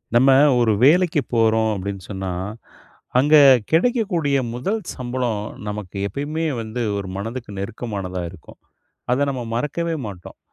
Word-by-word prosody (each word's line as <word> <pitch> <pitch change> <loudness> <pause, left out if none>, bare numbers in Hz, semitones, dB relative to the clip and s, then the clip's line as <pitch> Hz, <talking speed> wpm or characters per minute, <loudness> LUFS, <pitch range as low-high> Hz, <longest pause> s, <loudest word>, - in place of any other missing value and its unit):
நம்ம 130 +3 +6 0.3
ஒரு 115 -3 +3
வேலைக்கி 170 +2 +4
போறோம் 110 -1 +3
அப்டீன்னு 100 0 -5
சொன்னா, 95 -1 -4 0.9
அங்க 145 +4 +5 0.4
கெடைக்கக்கூடிய 175 - +2 0.2
முதல் 195 - -2 0.2
சம்பளம் 120 -4 -2 0.3
நமக்கு 105 -2 -6
எப்பயுமே 150 +7 -3 0.2
வந்து 115 +2 -5 0.2
ஒரு 100 - -4
மனதுக்கு 115 +3 -5
நெருக்கமானதா 100 -3 -4
இருக்கும். 90 -4 -15 0.5
அத 140 +3 +2
நம்ம 130 -2 -4
மறக்கவே 165 +6 -1
மாட்டோம். 95 -4 -10
120 Hz, 120 wpm, -21 LUFS, 105-150 Hz, 0.9 s, நம்ம